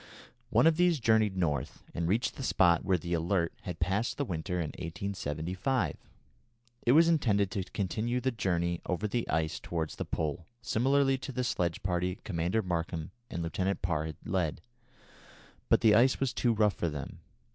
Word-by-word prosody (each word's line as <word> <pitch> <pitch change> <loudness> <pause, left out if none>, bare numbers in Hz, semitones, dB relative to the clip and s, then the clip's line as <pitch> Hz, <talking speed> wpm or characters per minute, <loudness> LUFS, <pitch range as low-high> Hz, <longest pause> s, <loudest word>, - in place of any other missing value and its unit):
One - - +4
of 165 -1 +5
these 175 -3 +3
journeyed 110 -4 +3
North, 75 -7 -1
and 85 -1 -1
reached 110 +7 +1
the - - -7
spot 90 -9 +3
where 95 -1 +2
the 85 +1 -4
Alert 85 +1 +1
had 90 -3 -5
passed 95 +6 0
the 140 - -1
winter 90 -2 -3
in 85 -4 -1
1875. 90 - -2 0.9
It 120 - +6
was 165 +3 +7
intended 110 - +2
to 100 -4 -2
continue 110 +6 -2
the 130 +1 0
journey 85 -6 -1
over 95 +4 -1
the 115 +2 -2
ice 80 -1 0
towards 80 -2 -4
the - - -3
Pole 80 +1 -3
similarly 135 +3 +2
to 135 - -6
the 125 -1 -2
sledge 85 -8 -1
party 90 0 -1
Commander 90 +4 0
Markham 85 -3 -3 0.2
and 85 - -3
Lieutenant 95 +4 -1
Parr 80 -3 0
had 80 - -7
led, 85 -6 -1 1.1
but - - +4
the 110 -2 +6
ice 125 +5 +5
was 135 -3 0
too 120 - +2
rough 105 -2 +3
for 85 - -1
them. 75 -2 -6
95 Hz, 175 wpm, -30 LUFS, 85-115 Hz, 1.1 s, was